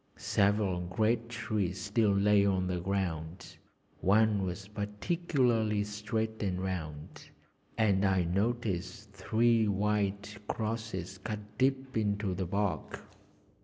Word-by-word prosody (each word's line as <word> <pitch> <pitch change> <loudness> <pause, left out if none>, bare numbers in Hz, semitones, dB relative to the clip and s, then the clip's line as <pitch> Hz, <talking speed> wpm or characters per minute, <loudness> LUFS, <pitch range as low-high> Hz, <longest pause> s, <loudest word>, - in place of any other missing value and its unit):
Several 100 -2 +2
great 110 +6 0
trees 105 -5 -2
still 105 +3 +1
lay 100 +1 +4
on 95 -2 +2
the 90 -1 -1
ground; 90 -2 -3 0.4
one 105 +1 +3
was 95 +2 -4
particularly 110 - 0
straight 110 +2 -3
and 95 -3 -1
round, 80 -6 -5 0.5
and 100 -3 +3
I 95 -2 +3
noticed 100 0 -2
three 110 +3 +2
wide 100 0 0 0.2
crosses 110 -5 -3
cut 105 +1 -6
deep 135 0 +1
into 105 -3 0
the 95 0 -2
bark. 100 +1 -2
100 Hz, 110 wpm, -31 LUFS, 95-110 Hz, 0.5 s, lay